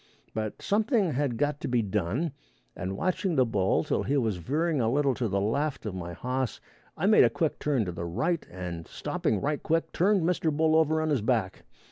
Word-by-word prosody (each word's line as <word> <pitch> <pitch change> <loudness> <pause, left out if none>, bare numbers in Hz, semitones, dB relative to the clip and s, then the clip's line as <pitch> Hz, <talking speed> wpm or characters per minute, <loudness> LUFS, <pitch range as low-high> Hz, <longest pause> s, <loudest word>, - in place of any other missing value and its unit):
But 110 -1 -4
something 210 - +2
had 135 -3 -1
got 145 +2 0
to - - -3
be 120 -2 +1
done, 105 - -1 0.4
and 95 +2 -4
watching 185 - 0
the 130 -2 +4
bull 100 -5 +1
till - - 0
he 145 - 0
was 110 -7 0
veering 150 - 0
a 115 0 +1
little 140 0 +2
to 120 -1 -1
the 100 -1 0
left 135 +8 -1
of 105 - -3
my 85 -2 -5
hoss 125 +5 -2 0.4
I 160 - -1
made 215 +1 +7
a 120 - +5
quick 155 +6 -1
turn 135 -7 +1
to 90 - -3
the 85 0 -5
right, 160 - -1
and 85 -2 -6
stopping 105 - -1
right 145 +1 -1
quick, 165 +1 0
turned 195 0 +2
Mr. 165 -2 +1
Bull 155 +1 +2
over 160 0 +3
on 155 - 0
his 135 -6 +2
back. 110 -4 -1
135 Hz, 210 wpm, -28 LUFS, 105-160 Hz, 0.4 s, made